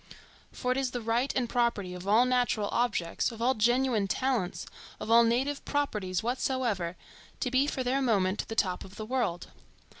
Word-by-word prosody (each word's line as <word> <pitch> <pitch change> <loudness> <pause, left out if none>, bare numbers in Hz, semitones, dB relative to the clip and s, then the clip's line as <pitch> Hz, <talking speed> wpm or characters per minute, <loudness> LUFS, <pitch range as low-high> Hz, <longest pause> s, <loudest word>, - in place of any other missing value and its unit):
For 250 - -2
it 255 - +1
is 265 -2 0
the 245 -1 -4
right 235 +4 0
and 255 -2 +1
property 230 -6 0
of 180 +1 -8
all 220 +5 +5
natural 245 -5 +1
objects, 235 -5 0
of 225 - -10
all 245 +3 +3
genuine 240 -2 +2
talents, 240 -5 -1 0.3
of 225 - -4
all 235 +1 +8
native 260 +5 0
properties 210 -11 -1
whatsoever, 235 -7 -1 0.4
to 250 - -1
be 265 +2 +3
for 260 - -2
their 260 +2 +1
moment 200 -6 +1
the 225 - -5
top 185 -5 0
of 190 +1 -13
the 215 - -6
world. 235 -8 -2
235 Hz, 180 wpm, -29 LUFS, 205-255 Hz, 0.4 s, all